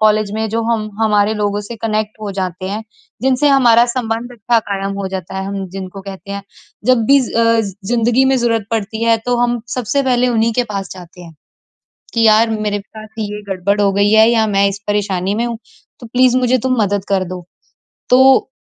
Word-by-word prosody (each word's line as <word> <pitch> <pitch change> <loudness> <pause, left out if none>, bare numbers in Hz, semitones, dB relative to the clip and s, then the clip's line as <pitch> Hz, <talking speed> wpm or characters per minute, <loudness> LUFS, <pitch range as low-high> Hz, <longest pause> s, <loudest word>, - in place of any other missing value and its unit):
College 215 -1 +2
में 220 0 -2
जो 225 +1 -1
हम, 225 -2 -1
हमारे 210 -1 +2
लोगों 205 -1 -1
से 210 +3 -8
कनेक्ट 215 -1 -2
हो 205 - -3
जाते 185 -1 -4
हैं, 210 +2 -4 0.4
जिनसे 265 +2 +2
हमारा 240 -4 +5
संबंध 240 -1 -3
अच्छा 235 0 +1
कायम 195 0 -2
हो 195 - -3
जाता 190 0 -6
है। 190 - -3
हम 195 -1 -4
जिनको 190 +1 -7
कहते 195 0 -9
हैं, 200 0 -5 0.4
जब 250 -3 +3
भी 280 0 +6
अ, 230 -2 +2
ज़िंदगी 225 +5 0
में 265 0 +3
ज़रूरत 230 -4 0
पड़ती 220 0 -2
है, 230 0 +4
तो 245 0 +1
हम 240 0 +1
सबसे 255 +3 0
पहले 250 -1 +2
उन्हीं 230 -1 +1
के 245 - +1
पास 195 -1 -4
जाते 180 0 -12
हैं 170 -2 -12 0.8
कि 230 - +1
यार 220 +1 +5
मेरे 205 -1 -1
पास 215 +2 -12
ये 210 -1 -4
गड़बड़ 195 +2 0
हो 200 - +3
गई 200 +1 +2
है 220 +1 +6
या 225 -2 +3
मैं 200 -1 +2
इस 200 0 -6
परेशानी 200 -2 -1
में 235 +2 0
हूँ, 235 -1 -4 0.4
तो 240 - -10
प्लीज़ 255 +1 +3
मुझे 255 0 +2
तुम 255 -3 +1
मदद 200 -1 -1
कर 195 -1 +1
दो। 180 -2 -8 0.6
तो 260 +1 +5
215 Hz, 205 wpm, -16 LUFS, 200-240 Hz, 0.8 s, भी